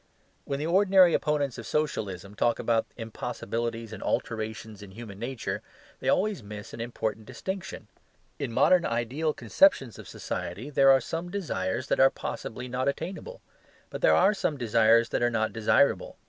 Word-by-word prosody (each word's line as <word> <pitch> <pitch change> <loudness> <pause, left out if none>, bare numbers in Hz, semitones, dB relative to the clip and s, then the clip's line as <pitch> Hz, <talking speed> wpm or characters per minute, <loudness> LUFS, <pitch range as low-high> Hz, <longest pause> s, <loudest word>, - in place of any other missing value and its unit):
When 140 - -2
the 150 - -3
ordinary 185 0 +5
opponents 145 -5 0
of 115 - -8
Socialism 100 -11 -2
talk 120 +2 +1
about 115 -1 +1
impossibilities 115 0 -4
and - - -8
alterations 110 -2 -3
in 100 - -10
human 100 -1 -10
nature 120 +1 -4 0.4
they - - -1
always 200 - +1
miss 105 0 -9
an 115 - -6
important 110 -2 -4
distinction. 180 - -6 0.5
In - - -3
modern 180 +9 +4
ideal 125 +7 -1
conceptions 150 - +2
of - - -10
society 105 +12 -5
there 135 -1 +5
are 135 -1 +6
some 165 +7 -4
desires 130 - -2
that - - +1
are 135 - +7
possibly 125 0 -6
not 125 +1 -2
attainable: 185 - -4 0.5
but - - -6
there - - +5
are 195 +3 +5
some 160 -7 -1
desires 115 -1 +4
that - - -1
are 120 - +3
not 110 -2 -1
desirable. 115 +5 +2
120 Hz, 160 wpm, -27 LUFS, 110-155 Hz, 0.5 s, are